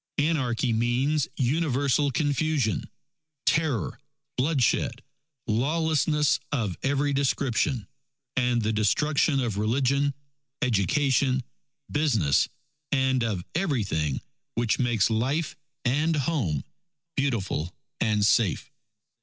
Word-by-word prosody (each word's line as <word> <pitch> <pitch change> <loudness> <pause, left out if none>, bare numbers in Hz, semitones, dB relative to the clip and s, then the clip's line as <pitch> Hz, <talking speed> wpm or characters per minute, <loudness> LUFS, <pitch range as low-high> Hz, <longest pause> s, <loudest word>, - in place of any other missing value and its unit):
Anarchy 130 -6 +1
means 125 +6 +1
universal 140 0 +1
confusion, 140 - 0 0.6
terror, 155 -8 +1 0.4
bloodshed, 130 -2 +1 0.4
lawlessness 150 +4 +2
of 110 -10 -1
every 140 +1 +1
description, 135 -3 0 0.5
and 125 -1 +2
the 110 +1 0
destruction 140 +7 +2
of 115 -6 -1
religion, 135 +5 +1 0.5
education, 130 - +2 0.5
business, 115 - +2 0.4
and 130 -3 +2
of 100 -6 -2
everything 105 - 0 0.4
which 115 -1 +1
makes 120 -4 +2
life 135 +8 0 0.3
and 150 +6 +2
home 130 - 0 0.5
beautiful 105 - -1 0.3
and 105 -2 +2
safe. 105 -3 +2
130 Hz, 85 wpm, -26 LUFS, 110-145 Hz, 0.6 s, lawlessness